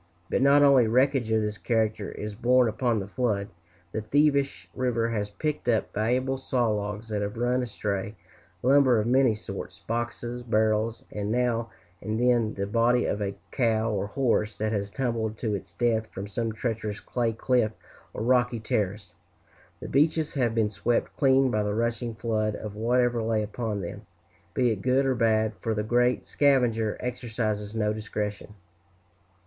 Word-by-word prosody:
But - - +1
not 140 +1 +6
only 135 -5 +6
wreckage 130 0 +2
of 110 -1 +2
this 105 -1 -3
character 110 -3 0
is 105 0 -6
borne 125 +3 +3
upon 115 +1 0
the 100 - -2
flood. 105 -3 -1 0.4
The 110 - -3
thievish 140 +4 +1
river 120 -3 0
has 105 -2 -2
picked 150 +3 -3
up 115 -2 +1
valuable 130 +5 0
saw 125 -3 0
logs 105 +1 -3
that 105 -1 -1
have 105 +2 -3
run 125 +2 +1
astray, 105 -3 -3 0.5
lumber 130 -2 +5
of 105 - 0
many 125 -1 +3
sorts, 110 - -7
boxes, 120 +1 -3
barrels 110 -1 +1
and 105 0 -3
now 120 -1 0 0.3
and 110 +1 -2
then 120 -3 +2
the 100 - -2
body 115 +4 +2
of 105 - -1
a 100 -1 -2 0.2
cow 115 -3 +1
or 100 -1 -1
horse 115 -2 0
that 110 0 -1
has 100 -2 -2
tumbled 115 -2 -2
to 110 -2 -2
its 100 - -5
death 115 -2 0
from 95 -1 -7
some 115 +2 -2
treacherous 110 -2 -3
clay 120 -2 -1
cliff 115 -1 +1 0.4
or 110 - -5
rocky 125 -1 +2
terrace. 100 -3 -2 0.7
The - - -6
beaches 155 +2 +2
have 120 -5 0
been 110 -2 +2
swept 120 +3 -1
clean 135 -2 +4
by 110 - +1
the 105 0 -1
rushing 115 0 -1
flood, 110 -1 -1
of 105 -1 -6
whatever 120 +1 +1
lay 110 -1 0
upon 105 -1 -3
them, 100 +4 -7 0.5
be 125 -2 +3
it 105 -3 -3
good 130 +3 +2
or 135 - +2
bad, 110 -2 +2
for 115 -2 -1
the 105 - -1
great 120 +3 +2
scavenger 120 -6 +2
exercises 110 -4 -3
no 105 -1 +1
discretion. 105 -1 -5
115 Hz, 170 wpm, -27 LUFS, 105-125 Hz, 0.7 s, not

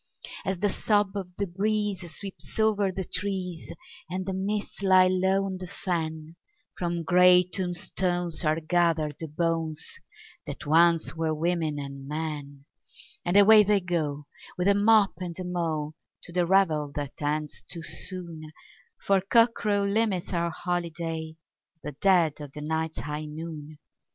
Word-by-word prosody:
As 190 -1 -1
the 205 +4 +1
sob 205 0 +1
of 180 -3 -5
the 200 - 0
breeze 200 -1 -2
sweeps 195 +4 -8
over 210 -3 +2
the 190 +1 -4
trees, 185 -3 -3 0.4
and 185 +1 -3
the 190 - -3
mists 200 +2 -3
lie 185 -1 +6
low 190 +1 +2
on 190 -1 -4
the 185 - -6
fen, 165 -3 -4 0.4
From 170 -1 -2
grey 180 +1 +6
tombstones 175 -1 -1
are 155 0 +1
gathered 160 -3 +1
the 160 - -5
bones 160 0 -2 0.5
that - - -6
once 165 +2 +4
were 160 -1 -1
women 165 -2 -1
and 140 -1 -7
men, 145 -2 -5 0.6
And 175 +3 +2
away 210 +1 +8
they 205 0 +3
go, 155 -5 -2 0.3
with 180 +1 0
a 200 - +6
mop 205 0 +4
and 175 -2 -6
a 185 - -4
mow, 160 -4 -2 0.3
to - - -10
the 175 0 +1
revel 160 -6 +2
that 145 0 -5
ends 150 0 -2
too 170 -2 -3
soon, 170 -4 -2 0.6
For 195 -1 +3
cockcrow 210 0 +3
limits 200 -3 0
our 170 -1 0
holiday—the 165 -2 -5
dead 175 -6 +3
of 145 -2 -9
the 150 - -7
night's 160 +1 -2
high 150 +1 -4
noon! 155 -1 -8
175 Hz, 145 wpm, -27 LUFS, 160-190 Hz, 0.6 s, away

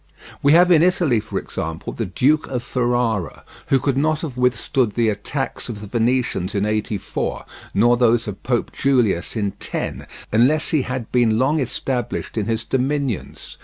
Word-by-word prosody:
We 140 +1 +5
have 175 +2 +6
in 160 -3 +6
Italy, 175 -9 +3
for 105 - -5
example, 80 +1 -5
the 115 - -3
Duke 145 - +2
of 125 -3 -3
Ferrara, 120 -7 -1 0.2
who 135 - +4
could 135 0 0
not 155 +2 +1
have 150 -7 -5
withstood 125 -1 +1
the 115 -2 +2
attacks 125 +7 -3
of 110 -3 -5
the 105 - -8
Venetians 115 -3 0
in 100 0 +1
'84, 105 -2 -2 0.3
nor 120 +4 +5
those 120 -1 +3
of 100 -2 -6
Pope 120 -2 -1
Julius 120 -10 +1
in 100 -3 -1
'10, - - -4 0.2
unless 130 +8 +3
he 155 - +3
had 125 -3 -5
been 115 -3 +3
long 140 +6 +2
established 125 -2 -3
in 110 -2 -1
his 115 0 -1
dominions. 135 -3 -2
120 Hz, 165 wpm, -21 LUFS, 110-135 Hz, 0.3 s, have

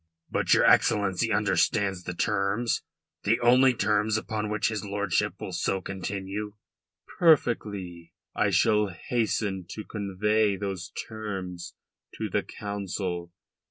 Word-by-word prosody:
"But - - +3
your - - +4
Excellency 100 +2 +3
understands 100 -1 +1
the 90 - -4
terms 105 +4 0 0.4
the 115 +3 +2
only 125 +2 +5
terms 105 +1 +1
upon 110 -1 -3
which 105 0 +1
his 110 -1 -3
lordship 100 -2 0
will - - -5
so 95 - 0
continue?" 95 +2 -5 0.7
"Perfectly. 100 - +2 0.2
I - - +2
shall 105 -2 +3
hasten 100 -1 -2
to 110 - -6
convey 105 +1 0
those 95 -2 -5 0.2
terms 95 -5 -6 0.4
to - - -3
the - - +2
Council. 95 -4 -4
100 Hz, 120 wpm, -27 LUFS, 95-110 Hz, 0.7 s, only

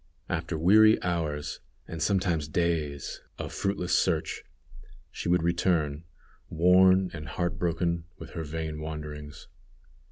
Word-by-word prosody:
After 80 0 -2
weary 110 +7 +6
hours, 80 -4 -2 0.3
and 80 -1 -6
sometimes 90 -5 +1
days, 75 -3 -1 0.2
of - - -6
fruitless 100 -2 0
search, - - 0 0.7
she - - -4
would 90 -1 +3
return, 85 -3 +1 0.4
worn 95 +2 +5
and 75 -2 -7
heart 85 -1 -2
broken 85 -1 0
with - - -10
her 80 - -4
vain 80 0 -4
wanderings. 75 -2 -7
85 Hz, 120 wpm, -28 LUFS, 75-90 Hz, 0.7 s, weary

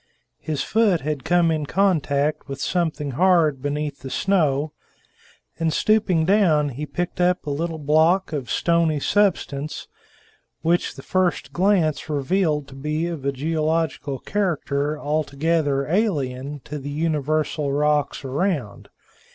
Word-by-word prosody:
His 150 -3 -3
foot 210 -6 +2
had 150 -1 -3
come 175 -1 +3
in 155 -2 -1
contact 155 -6 +1
with 135 -1 -6
something 160 -5 -1
hard 160 -3 +3
beneath 145 0 -3
the 130 - -8
snow, 155 -5 +1 0.9
and, 165 -1 +1
stooping 190 -3 +2
down, 170 -7 +3
he 145 +4 -6
picked 175 +5 -3
up 180 -1 +2
a 145 - -2
little 160 +3 -2
block 160 +5 +2
of 140 -5 -4
stony 170 -3 +2
substance, 155 -6 0 0.8
which 170 +2 +1
the 135 - -10
first 185 -2 0
glance 175 -7 +1
revealed 150 0 0
to 135 - -12
be 150 +4 -2
of 165 -5 -4
a 140 - +2
geological 155 0 -1
character 150 -6 -1
altogether 145 -1 0
alien 145 - -1
to 150 +3 -7
the 140 +1 -6
universal 155 -1 -1
rocks 150 0 0
around. 140 - -2
155 Hz, 130 wpm, -23 LUFS, 145-170 Hz, 0.9 s, come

